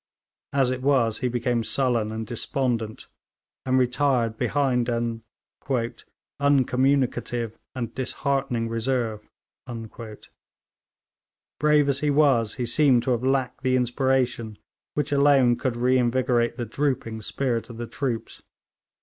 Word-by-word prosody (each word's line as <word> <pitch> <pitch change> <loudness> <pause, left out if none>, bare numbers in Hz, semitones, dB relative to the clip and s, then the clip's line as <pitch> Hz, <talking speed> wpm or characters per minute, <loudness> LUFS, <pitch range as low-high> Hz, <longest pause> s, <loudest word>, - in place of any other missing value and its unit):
As 135 -2 +2
it 130 0 -3
was 130 -5 +2
he 130 - 0
became 120 -1 0
sullen 120 -3 +1
and 110 0 -4
despondent, 120 -2 -2 0.6
and 130 0 +3
retired 125 -3 +1
behind 125 -2 +1
an 115 -1 -2 1.2
'uncommunicative 130 -4 +1 0.2
and 120 -3 -4
disheartening 130 -2 -1
reserve.' 115 -2 -2 2.3
Brave 150 -1 +4
as 140 -1 +1
he 150 - 0
was, 140 -7 +3
he 125 - -2
seems 125 -1 +3
to 130 - +1
have 120 0 0
lacked 130 -1 0
the 130 -1 +2
inspiration 125 -3 0 0.4
which 150 -1 -1
alone 140 -4 +4
could 125 0 -2
reinvigorate 125 -1 +2
the 120 - -3
drooping 115 -2 -2
spirit 115 0 -2
of 115 - -9
the 120 - -4
troops. 120 -2 -4
125 Hz, 115 wpm, -25 LUFS, 115-135 Hz, 2.3 s, Brave